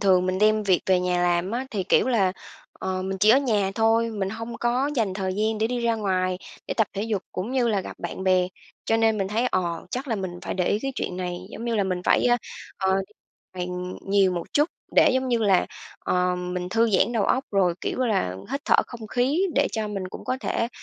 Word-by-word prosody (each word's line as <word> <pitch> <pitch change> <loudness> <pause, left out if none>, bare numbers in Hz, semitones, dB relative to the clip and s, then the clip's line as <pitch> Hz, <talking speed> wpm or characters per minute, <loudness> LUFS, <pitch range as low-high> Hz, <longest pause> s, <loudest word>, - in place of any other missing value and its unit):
thường 185 -2 +4
mình 185 0 0
đem 215 +1 +4
việc 185 -3 +3
về 185 -1 +4
nhà 180 -1 +1
làm 175 +1 +1
á 250 +4 -2
thì, 195 -4 -2
kiểu 250 - +3
là, 195 -7 +2 0.4
ờ, 185 0 -3
mình 190 0 -3
chỉ 215 +3 +5
ở 260 - +7
nhà 210 -8 +1
thôi, 225 +1 +3
mình 195 -3 -2
hông 230 +2 -6
có 250 +4 +1
dành 210 -5 +1
thời 190 -1 -2
gian 215 +1 0
để 220 - +2
đi 245 0 -2
ra 230 -1 +2
ngoài, 185 -3 0 0.3
để - - -1
tập 220 -3 +2
thể 200 - -2
dục 215 -3 -1
cũng 185 +6 -3
như 250 -3 +2
là 205 -3 +1
gặp - - -9
bạn 175 +2 -5
bè. 185 -1 +3 0.4
Cho 225 - +2
nên 225 -1 +2
mình 195 -1 -1
thấy, 230 +4 +1
ờ, 175 -6 -1
chắc 260 +2 -4
là 225 - +1
mình 185 -2 -5
phải - - -3
để 180 -2 0
ý 205 - +2
cái 270 0 -2
chuyện 180 - -3
này, 180 -1 -3
giống 230 - -7
như 235 -1 -1
là, 200 - +2
mình 185 -1 -2
phải, - - +3
ơ, 240 0 +5 0.4
ờ, 190 0 +2 0.6
đi 180 0 -2
ngoài - - -7 0.4
nhiều 195 -2 +4
một 170 -1 -5
chút 295 +3 +3 0.3
để, - - +7
giống 260 0 0
như 240 - +2
là, 200 -5 +3 0.3
ờ, 180 0 +1
mình 180 0 -4
thư 225 +3 +2
giãn 205 +4 +3
đầu 220 -4 +1
óc, 260 +1 +1
rồi, 185 -4 +3
kiểu - - -3
là, 195 - 0 0.2
hít 275 - -1
thở - - +5
không 230 -3 -9
khí 260 +9 +1
để 280 - +3
cho 220 -2 -2
mình 195 -3 -4
cũng - - -9
có 255 - -1
thể, 230 - -1
205 Hz, 250 wpm, -25 LUFS, 185-230 Hz, 0.6 s, ở